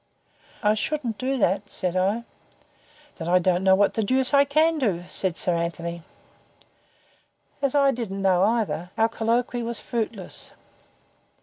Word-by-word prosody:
"I 210 0 +4
shouldn't 235 +1 -2
do 265 +1 -1
that," 200 -2 0
said 180 -1 -2
I. 195 +5 +1 0.9
"Then, 165 - -6
I 180 - +5
don't 180 0 +1
know 190 0 +5
what 200 +1 +2
the 225 - -1
deuce 260 +6 +1
I 280 0 +6
can 310 +3 +2
do," 195 -10 0
said 185 -3 0
Sir 180 - +2
Anthony. 170 0 -3 1.6
As 275 0 0
I 280 -1 +4
didn't 195 -6 -4
know, 185 -2 +3
either, 210 -5 0
our 225 - +4
colloquy 235 +2 -1
was 235 0 -3
fruitless. 225 -5 -5
215 Hz, 145 wpm, -24 LUFS, 185-245 Hz, 1.6 s, I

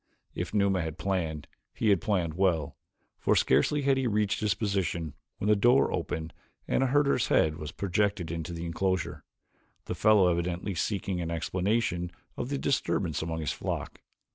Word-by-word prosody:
If - - -4
Numa 100 -3 +2
had 80 0 -4
planned, 85 -6 -2 0.3
he 110 - +1
had 100 -4 +4
planned 90 -6 0
well, 85 -4 +1 0.4
for - - +2
scarcely 150 -1 +3
had 135 -1 +3
he 130 -1 +1
reached 105 -2 +1
his 105 -2 +1
position 90 -7 -1 0.2
when 100 - -3
the 105 - +5
door 120 +6 +4
opened 80 -2 -3 0.3
and - - +1
a 135 - +3
herder's 140 -2 +2
head 80 0 +3
was 75 -2 -6
projected 100 -2 -1
into 85 0 -4
the 85 0 -5
enclosure, 85 -3 -1 0.6
the - - -3
fellow 105 -3 +5
evidently 85 +3 -2
seeking 95 0 -2
an 85 - -3
explanation 90 +2 -1 0.2
of 120 - -4
the 140 - -1
disturbance 100 - 0
among 80 0 -3
his 75 - -1
flock. - - -4
95 Hz, 165 wpm, -29 LUFS, 85-105 Hz, 0.6 s, the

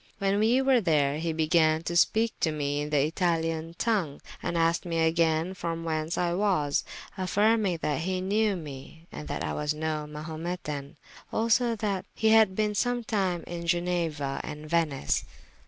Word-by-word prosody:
When 200 -1 +1
we 235 +5 +3
were 265 -3 +4
there, 150 -5 +2
he 165 0 -1
began 160 0 +2
to 170 - -3
speake 220 +6 +3
to 160 - +1
me 145 -1 -1
in 150 - -4
the 145 -2 +3
Italian 165 -1 -1
tongue, 195 -11 0 0.2
and 170 - -2
asked 165 0 +2
me 170 -2 -3
agayne 165 +1 +2
from 165 -2 -4
whence 160 0 -2
I 175 -1 +1
was, 180 -7 +1 0.4
affyrming 205 0 +2
that 150 0 0
he 185 +2 -1
knewe 205 +2 +1
me, 155 0 -9
and 150 - -8
that - - -3
I - - -2
was 150 0 -1
no 155 -1 -2
Mahumetan: 155 -2 -5 0.4
also 230 +1 +2
that 205 -4 -2
he 220 - +2
had 220 -4 +5
been 210 0 +1
sometyme 210 -6 0
in 170 0 -6
Genua 170 -5 -1
and 150 0 -7
Venice. 155 -4 0
170 Hz, 165 wpm, -28 LUFS, 155-195 Hz, 0.4 s, had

